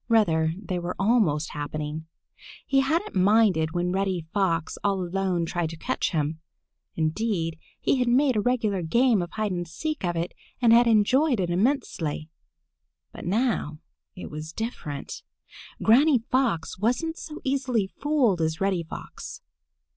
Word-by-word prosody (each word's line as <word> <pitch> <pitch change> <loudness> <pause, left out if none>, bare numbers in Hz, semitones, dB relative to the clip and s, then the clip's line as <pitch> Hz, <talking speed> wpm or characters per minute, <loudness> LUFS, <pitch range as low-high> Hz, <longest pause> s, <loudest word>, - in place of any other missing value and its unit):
Rather, 165 -8 +3
they 190 -3 -3
were 175 +1 -4
almost 195 -8 +2
happening. 150 +1 -5 0.6
He 275 - +3
hadn't 320 +9 0
minded 190 -5 +3
when 175 0 0
Reddy 190 -3 -1
Fox 175 -5 0
all 200 -1 +1
alone 180 -1 -1
tried 170 -1 -2
to 165 - -8
catch - - -1
him. 155 0 -1 0.6
Indeed, 165 0 -1 0.2
he - - +2
had 250 -1 +1
made 260 +1 +3
a 210 - +2
regular 220 -5 0
game 230 +5 +3
of 175 - -4
hide 215 -2 -1
and 175 -1 -3
seek 305 - -4
of 175 -1 0
it 170 +1 -2 0.3
and 235 -2 +5
had 235 +1 +6
enjoyed 245 +5 +3
it 175 -2 0
immensely. 180 - -1 0.8
But - - -9
now 195 - 0 0.4
it 180 - -8
was 155 +1 -6
different. 155 - -5 0.6
Granny 270 +6 +6
Fox 230 -8 -1
wasn't 250 - 0
so 310 -2 -8
easily 260 -6 0
fooled 250 - +1
as 160 0 0
Reddy 195 -3 +1
Fox. 160 - -9
195 Hz, 145 wpm, -26 LUFS, 165-240 Hz, 0.8 s, had